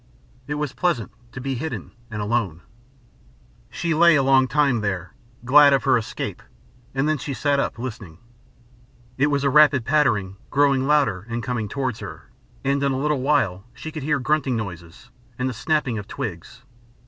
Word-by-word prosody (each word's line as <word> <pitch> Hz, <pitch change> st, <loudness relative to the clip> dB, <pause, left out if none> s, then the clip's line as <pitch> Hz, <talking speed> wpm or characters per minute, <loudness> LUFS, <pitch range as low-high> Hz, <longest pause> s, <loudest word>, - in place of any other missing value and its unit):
It 145 Hz, -, -2 dB
was 150 Hz, -2 st, -3 dB
pleasant 125 Hz, -, -1 dB, 0.2 s
to 125 Hz, -, -8 dB
be 135 Hz, +2 st, -3 dB
hidden 120 Hz, -, -5 dB, 0.2 s
and 105 Hz, -2 st, -4 dB
alone. 105 Hz, -7 st, -1 dB, 1.1 s
She 170 Hz, -1 st, -2 dB
lay 170 Hz, 0 st, +6 dB
a 140 Hz, -, +3 dB
long 130 Hz, -1 st, +4 dB
time 140 Hz, -5 st, +2 dB
there, 95 Hz, -4 st, -3 dB, 0.3 s
glad 140 Hz, +2 st, +7 dB
of 135 Hz, -, +2 dB
her 135 Hz, -, +4 dB
escape, 115 Hz, -3 st, -4 dB, 0.5 s
and 135 Hz, +2 st, +1 dB
then 155 Hz, -2 st, +1 dB
she 140 Hz, +2 st, -4 dB
sat 145 Hz, 0 st, +1 dB
up -, -, -2 dB
listening. 110 Hz, -9 st, -7 dB, 1.0 s
It 140 Hz, -, +4 dB
was 140 Hz, -1 st, 0 dB
a 140 Hz, -, +2 dB
rapid 145 Hz, -4 st, +5 dB
pattering 105 Hz, -10 st, +1 dB
growing 140 Hz, -2 st, +2 dB
louder 115 Hz, -10 st, +2 dB
and 115 Hz, 0 st, -3 dB
coming 115 Hz, -3 st, -3 dB
towards 130 Hz, -2 st, -2 dB
her, -, -, -10 dB, 0.3 s
and 140 Hz, +1 st, +1 dB
in 140 Hz, -1 st, +1 dB
a -, -, -1 dB
little 145 Hz, 0 st, 0 dB
while 130 Hz, -10 st, +1 dB
she 155 Hz, +6 st, -7 dB
could 155 Hz, -1 st, -6 dB
hear 150 Hz, +2 st, +1 dB
grunting 135 Hz, -1 st, 0 dB
noises 90 Hz, +2 st, -8 dB, 0.3 s
and 125 Hz, -, -1 dB
the 130 Hz, -, -2 dB
snapping 130 Hz, -2 st, 0 dB
of 100 Hz, -, -9 dB
twigs. -, -, -7 dB
130 Hz, 175 wpm, -23 LUFS, 110-145 Hz, 1.1 s, glad